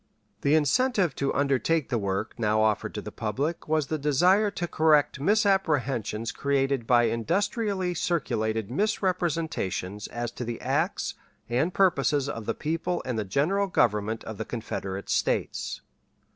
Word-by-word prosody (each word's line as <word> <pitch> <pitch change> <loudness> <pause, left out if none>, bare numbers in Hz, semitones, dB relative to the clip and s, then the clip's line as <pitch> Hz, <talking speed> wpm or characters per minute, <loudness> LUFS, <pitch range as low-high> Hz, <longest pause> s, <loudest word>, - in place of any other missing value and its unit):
The 145 +2 +3
incentive 185 - +2
to 140 - 0
undertake 140 +2 +1
the 120 -3 0
work 100 +1 -2
now 110 -1 +2
offered 110 -1 0
to - - -4
the - - -7
public 140 +10 -3
was 155 -1 +1
the 155 +2 -3
desire 180 +9 +3
to 180 -3 -4
correct 150 -4 +3
misapprehensions 145 - +1
created 135 -3 0
by 120 -1 +5
industriously 185 - 0
circulated 110 - -1
misrepresentations 165 - -1
as 120 -1 -4
to 125 - -6
the 120 -1 -4
acts 150 +8 -1 0.3
and 130 +9 +1
purposes 145 -7 +2
of 115 -6 -5
the - - 0
people 165 +3 -2
and 125 -3 -2
the - - 0
General 155 - +1
Government 110 - +1
of 110 -1 -7
the 110 - -3
Confederate 100 -4 -5
States. - - -1
140 Hz, 145 wpm, -27 LUFS, 115-175 Hz, 0.3 s, by